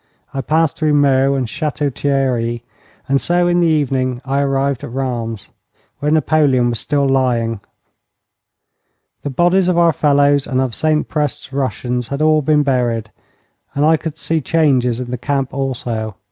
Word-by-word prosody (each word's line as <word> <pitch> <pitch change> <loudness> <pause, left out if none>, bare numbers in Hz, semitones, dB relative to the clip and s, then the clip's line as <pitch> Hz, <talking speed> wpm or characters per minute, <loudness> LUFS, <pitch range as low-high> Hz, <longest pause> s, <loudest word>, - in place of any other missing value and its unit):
I 135 - -2
passed 160 +2 +1
through 155 -2 +2
Meaux 140 -1 +3
and 130 -2 -1
Château 145 +3 -2
Thierry, 125 -4 -1 0.4
and 135 0 +1
so 175 0 +2
in 175 0 +2
the 170 - +3
evening 130 -5 0
I 135 +1 0
arrived 135 -1 0
at - - -6
Rheims, 120 -4 -4 0.5
where 145 +2 -1
Napoleon 150 -5 +2
was 115 - 0
still 140 -1 0
lying. 120 -4 +1 1.6
The 145 - -4
bodies 175 +6 +2
of 180 -2 +1
our 170 -1 +4
fellows 145 -1 +2
and 130 - -1
of 130 -3 -1
St 155 +4 +1
Prest's 150 -3 -3
Russians 125 -3 -2
had 140 - -4
all 155 0 +4
been 150 +1 +2
buried, 120 -5 -1 0.6
and 145 +2 +2
I 160 +1 +5
could 160 -1 -5
see 165 -1 -1
changes 130 -7 +1
in 125 -1 -5
the 125 - -4
camp 135 0 -2
also. 120 -6 -3
135 Hz, 160 wpm, -17 LUFS, 125-150 Hz, 1.6 s, I